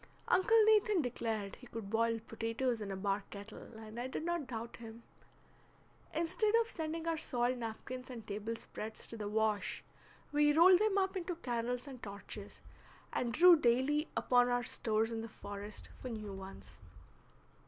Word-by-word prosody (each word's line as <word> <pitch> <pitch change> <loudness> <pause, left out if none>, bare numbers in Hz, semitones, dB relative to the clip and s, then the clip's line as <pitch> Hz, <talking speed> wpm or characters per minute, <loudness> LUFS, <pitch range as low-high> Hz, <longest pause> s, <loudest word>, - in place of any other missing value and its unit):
Uncle 410 +5 +5
Nathan 425 -5 +4
declared 225 -5 -3
he 250 - -13
could 225 -4 -7
boil 230 0 +2
potatoes 230 +2 -2
in 205 - -4
a 195 - -3
bark 195 +1 -1
kettle, 215 +2 -10
and 220 +1 -8
I 245 - -2
did 260 - -4
not 345 -5 -1
doubt 230 -1 -5
him. 230 0 -10 1.1
Instead 365 +7 +1
of 460 0 +4
sending 325 -5 -4
our 330 -1 +1
soiled 245 -1 0
napkins 250 +3 -6
and 235 -4 -7
table 215 +3 -3
spreads 220 -1 -7
to - - -6
the 210 -2 -4
wash, 215 -1 0 0.5
we 295 0 +4
rolled 355 +3 +8
them 425 -1 +2
up 385 0 +1
into 360 -1 -2
candles 245 -2 -2
and 260 -3 -9
torches, 200 0 -8 0.5
and 240 - 0
drew 350 +7 +8
daily 285 +3 +2
upon 245 -1 +4
our 245 0 +1
stores 220 -1 0
in 225 -1 -2
the 225 - -6
forest 205 0 -8
for 255 - -5
new 215 -3 -5
ones. 190 0 -10
240 Hz, 165 wpm, -35 LUFS, 220-305 Hz, 1.1 s, rolled